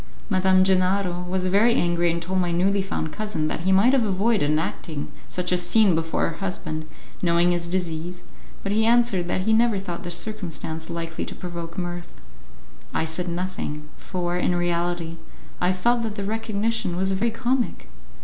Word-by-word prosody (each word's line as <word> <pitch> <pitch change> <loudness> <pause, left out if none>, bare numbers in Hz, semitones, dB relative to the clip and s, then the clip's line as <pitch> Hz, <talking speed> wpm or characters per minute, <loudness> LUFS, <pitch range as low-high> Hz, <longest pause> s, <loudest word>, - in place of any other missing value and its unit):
Madame 185 0 +4
Gennaro 185 -1 +2
was 185 0 0
very 210 +6 +4
angry 175 0 +2
and 170 0 0
told 185 +2 -1
my 175 -1 0
newly 195 +4 +2
found 160 -5 -3
cousin 210 -8 -2
that - - -2
he 185 +3 +1
might 200 +7 +5
have 265 -3 +4
avoided 200 -4 +2
enacting 155 -1 -2 0.2
such 180 0 -1
a 180 - +3
scene 185 +2 +4
before 165 0 0
her 165 - -5
husband, 155 -5 -4 0.3
knowing 175 0 +3
his 175 -1 0
disease, 175 -1 -3 0.4
but 200 - -2
he 220 +2 +3
answered 230 -6 +3
that 180 - 0
he 220 +4 +2
never 230 -1 +4
thought 180 -3 -5
the 175 - -4
circumstance 170 -4 -3
likely 165 -1 -4
to - - -7
provoke 170 -2 -6
mirth. 175 - -5 0.8
I - - +1
said 175 +3 -2
nothing, 170 -4 -4
for, 175 -1 -3
in 180 0 +1
reality, 175 -1 -1 0.4
I 180 - +3
felt 235 +6 +2
that 220 -2 -3
the 200 - -3
recognition 220 -1 -1
was 190 +1 +1
very 200 +5 +1
comic. 240 +2 -1
180 Hz, 175 wpm, -24 LUFS, 170-200 Hz, 0.8 s, might